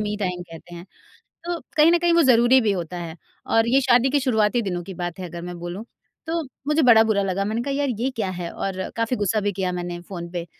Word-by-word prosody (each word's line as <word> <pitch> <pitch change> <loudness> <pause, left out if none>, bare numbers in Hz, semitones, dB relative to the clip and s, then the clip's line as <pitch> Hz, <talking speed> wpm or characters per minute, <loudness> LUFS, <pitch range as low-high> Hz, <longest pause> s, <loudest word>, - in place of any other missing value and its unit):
Me 210 0 -2
time 180 -2 -2
कहते 170 0 -12
हैं। 170 0 -9 0.6
तो 345 -1 -2 0.2
कहीं 310 +2 +6
न 345 - +5
कहीं 345 0 +2
वो 335 - +5
ज़रूरी 250 0 +5
भी 215 -3 +1
होता 180 -2 -4
है 170 -2 -6 0.3
और 225 0 +2
ये 270 +3 +4
शादी 250 0 +4
के 285 +2 +2
शुरुआती 235 -3 +1
दिनों 180 -4 -3
की 190 - -8
बात 175 +1 -4
है 185 - -5
अगर 170 +1 -7
मैं 175 0 -7
बोलूँ। 175 +4 -6 0.4
तो 330 +1 -1 0.3
मुझे 300 +1 +2
बड़ा 235 -4 +7
बुरा 220 -2 +1
लगा, 195 0 -1
मैंने 220 +3 -1
कहा, 280 - -2
"यार 285 0 0
ये 250 +3 0
क्या 215 -4 -2
है?" 175 -1 -4
और 190 -1 -4
काफ़ी 230 +2 0
गुस्सा 210 0 0
भी 205 0 0
किया 185 -1 -2
मैंने 175 -1 -4
फ़ोन 175 -1 -8
पे 175 -1 -4
205 Hz, 250 wpm, -23 LUFS, 175-250 Hz, 0.6 s, बड़ा